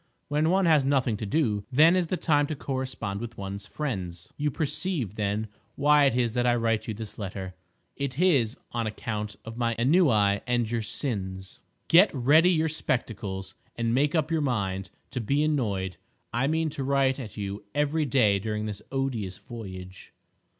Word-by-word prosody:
When 150 Hz, +2 st, +2 dB
one 190 Hz, +1 st, +3 dB
has 155 Hz, -4 st, +5 dB
nothing 130 Hz, -4 st, +2 dB
to 105 Hz, -, -4 dB
do, 105 Hz, -6 st, +1 dB
then 155 Hz, +7 st, +6 dB
is 180 Hz, -2 st, +1 dB
the 185 Hz, -, -1 dB
time 145 Hz, -3 st, +2 dB
to 155 Hz, -, -3 dB
correspond 130 Hz, -7 st, -3 dB
with 115 Hz, 0 st, -7 dB
ones 100 Hz, +1 st, -6 dB
friends. 95 Hz, -, -4 dB
You 150 Hz, 0 st, 0 dB
perceive, 150 Hz, -, -2 dB
then, 105 Hz, +1 st, -1 dB, 0.3 s
why 145 Hz, 0 st, +5 dB
it 135 Hz, -, +3 dB
is 120 Hz, -3 st, +1 dB
that 125 Hz, 0 st, +1 dB
I 120 Hz, -, +4 dB
write 115 Hz, -2 st, 0 dB
you 110 Hz, -, -3 dB
this 110 Hz, 0 st, -7 dB
letter—it 95 Hz, +7 st, -7 dB
is 140 Hz, -11 st, +3 dB
on 115 Hz, -2 st, -1 dB
account 105 Hz, -1 st, -4 dB
of 115 Hz, +1 st, -8 dB
my 115 Hz, -1 st, 0 dB
ennui 120 Hz, -, +4 dB
and 120 Hz, -2 st, +1 dB
your 115 Hz, -1 st, 0 dB
sins. 95 Hz, -6 st, -4 dB, 0.3 s
Get 180 Hz, +5 st, +7 dB
ready 150 Hz, +7 st, +5 dB
your 160 Hz, -3 st, +2 dB
spectacles 105 Hz, -10 st, -3 dB, 0.2 s
and 115 Hz, -1 st, 0 dB
make 145 Hz, +5 st, +2 dB
up 160 Hz, 0 st, +1 dB
your 160 Hz, -1 st, +2 dB
mind 95 Hz, -8 st, -1 dB, 0.2 s
to 125 Hz, -, -2 dB
be 140 Hz, +7 st, +1 dB
annoyed. 100 Hz, -, -1 dB, 0.4 s
I 120 Hz, +4 st, +1 dB
mean 160 Hz, 0 st, 0 dB
to 140 Hz, -, -4 dB
write 135 Hz, 0 st, +2 dB
at 110 Hz, -6 st, -8 dB
you 100 Hz, 0 st, -4 dB
every 150 Hz, +2 st, +1 dB
day 110 Hz, -7 st, +3 dB
during 105 Hz, +1 st, -3 dB
this 105 Hz, -1 st, -5 dB
odious 125 Hz, -9 st, -2 dB
voyage. 95 Hz, -5 st, -9 dB
120 Hz, 175 wpm, -27 LUFS, 105-145 Hz, 0.4 s, Get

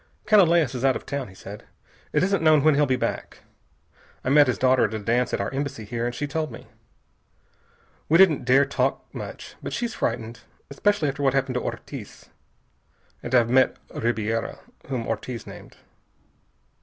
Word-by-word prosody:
"Canalejas 170 Hz, -, +4 dB
is 125 Hz, 0 st, -4 dB
out 135 Hz, -1 st, +3 dB
of -, -, -6 dB
town," 140 Hz, -2 st, -4 dB
he 95 Hz, -, -15 dB
said. 100 Hz, +2 st, -10 dB, 0.5 s
"It -, -, +2 dB
isn't 195 Hz, -1 st, +1 dB
known 155 Hz, -3 st, +5 dB
when 155 Hz, 0 st, +5 dB
he'll 145 Hz, +1 st, +3 dB
be 130 Hz, -, +2 dB
back. 125 Hz, -, -4 dB, 0.8 s
I -, -, -1 dB
met 145 Hz, +1 st, +6 dB
his 125 Hz, -, 0 dB
daughter 130 Hz, 0 st, +3 dB
at 110 Hz, -, -3 dB
a -, -, -1 dB
dance 115 Hz, +4 st, 0 dB
at -, -, -1 dB
our 100 Hz, -, -3 dB
Embassy 135 Hz, -5 st, -4 dB
here, 120 Hz, +2 st, -3 dB
and 120 Hz, -, -4 dB
she 145 Hz, -, -2 dB
told 155 Hz, +2 st, -3 dB
me. -, -, -10 dB, 1.4 s
We 165 Hz, -, +6 dB
didn't 180 Hz, -5 st, +5 dB
dare 130 Hz, +3 st, +4 dB
to 140 Hz, -, -11 dB
talk 130 Hz, +1 st, 0 dB
much, -, -, -8 dB
but -, -, -5 dB
she's 240 Hz, -2 st, -2 dB
frightened. 115 Hz, +1 st, -3 dB, 0.3 s
Especially 205 Hz, +2 st, +1 dB
after 140 Hz, +1 st, -3 dB
what 135 Hz, -1 st, +2 dB
happened 135 Hz, -1 st, 0 dB
to 125 Hz, -, -1 dB
Ortiz. -, -, -8 dB, 0.9 s
And 130 Hz, -, -2 dB
I've 120 Hz, -1 st, +4 dB
met 130 Hz, +1 st, +4 dB, 0.2 s
Ribiera, 115 Hz, -1 st, -2 dB, 0.3 s
whom 130 Hz, -4 st, -3 dB
Ortiz 115 Hz, +2 st, -4 dB
named." -, -, -12 dB
130 Hz, 180 wpm, -24 LUFS, 120-150 Hz, 1.4 s, met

